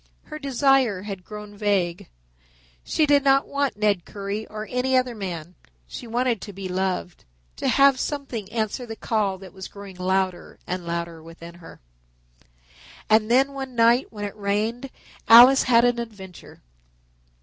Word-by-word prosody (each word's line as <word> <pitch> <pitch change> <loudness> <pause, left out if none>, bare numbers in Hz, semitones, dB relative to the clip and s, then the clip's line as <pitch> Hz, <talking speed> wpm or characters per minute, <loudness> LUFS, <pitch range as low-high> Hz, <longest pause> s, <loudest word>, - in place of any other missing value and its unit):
Her 305 -1 -9
desire 270 -7 +2
had 195 -3 -7
grown 210 0 -10
vague. 195 - -1 0.7
She 310 - +1
did 285 -1 +3
not 275 0 +3
want 280 -5 -1
Ned 205 -4 +1
Currie 205 +1 -5
or 215 0 -7
any 255 +1 +1
other 255 -1 0
man. 180 -5 -6 0.3
She 235 - -9
wanted 240 -2 0
to 205 - -8
be 195 -1 -7
loved, 185 -1 -3 0.3
to - - -2
have 275 -1 +4
something 265 -9 -4
answer 225 +2 -3
the 225 - -6
call 210 -4 -1
that 185 -1 -13
was 190 -1 -8
growing 200 -2 -11
louder 185 0 -2
and 180 -1 -5
louder 170 -1 -4
within 165 +1 -12
her. 175 -1 -14 1.3
And 215 0 +4
then 270 +3 +3
one 265 -2 -7
night 235 +2 +3
when 205 -2 -6
it 200 - -7
rained 215 +5 -2 0.4
Alice 245 +4 +9
had 235 0 +5
an 245 -1 +1
adventure. 195 - -10
215 Hz, 155 wpm, -24 LUFS, 190-250 Hz, 1.3 s, Alice